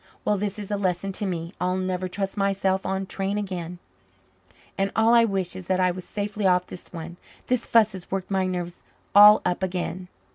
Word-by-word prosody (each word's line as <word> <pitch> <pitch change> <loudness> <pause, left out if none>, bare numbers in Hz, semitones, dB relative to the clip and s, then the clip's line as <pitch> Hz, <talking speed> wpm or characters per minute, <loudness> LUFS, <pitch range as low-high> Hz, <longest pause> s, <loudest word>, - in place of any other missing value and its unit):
Well, 210 - +2
this 205 0 -3
is 205 -1 -7
a 205 - 0
lesson 190 0 -1
to 200 +1 0
me! 170 -1 -4
I'll 180 +1 +1
never 185 0 -2
trust 195 +1 -4
myself 195 -1 0
on 190 0 -1
a - - -6
train 195 +1 -2
again, 180 -4 -4 1.0
and 195 0 0
all 225 +1 +4
I 235 -1 +6
wish 190 -4 -2
is 185 -2 -8
that 185 -1 +1
I 185 -1 +3
was 180 0 -8
safely 205 0 -2
off 180 -1 +3
this 180 - -11
one. 170 0 -8 0.3
This 250 -2 -1
fuss 220 -2 +4
has 185 -3 -10
worked 195 0 -4
my 190 -1 +1
nerves 175 -1 -4 0.3
all 210 +1 +9
up 180 0 0
again." 180 -1 -3
190 Hz, 210 wpm, -25 LUFS, 180-200 Hz, 1.0 s, all